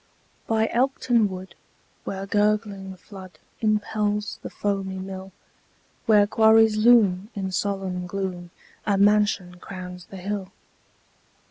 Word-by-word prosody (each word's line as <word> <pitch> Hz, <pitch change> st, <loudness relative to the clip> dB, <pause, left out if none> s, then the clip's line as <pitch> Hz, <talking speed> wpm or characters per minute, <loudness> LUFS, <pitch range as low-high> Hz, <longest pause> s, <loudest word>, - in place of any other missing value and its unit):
By 220 Hz, 0 st, +2 dB
Elkton 245 Hz, -3 st, +2 dB
wood, 185 Hz, 0 st, -8 dB, 0.5 s
where 195 Hz, 0 st, -4 dB
gurgling 205 Hz, -2 st, 0 dB
flood 185 Hz, -3 st, -12 dB, 0.2 s
Impels 210 Hz, -1 st, 0 dB
the -, -, -6 dB
foamy 195 Hz, -2 st, -2 dB
mill, 190 Hz, 0 st, -7 dB, 0.8 s
Where 210 Hz, -2 st, +6 dB
quarries 220 Hz, +1 st, +5 dB
loom, 215 Hz, -4 st, +4 dB
in 190 Hz, -2 st, -3 dB
solemn 185 Hz, -1 st, -2 dB
gloom, 180 Hz, -2 st, -4 dB, 0.4 s
A 200 Hz, -1 st, +2 dB
mansion 205 Hz, -3 st, +2 dB
crowns 180 Hz, -1 st, -8 dB
the 195 Hz, -, -11 dB
hill. 195 Hz, 0 st, -4 dB
200 Hz, 110 wpm, -24 LUFS, 190-210 Hz, 0.8 s, Where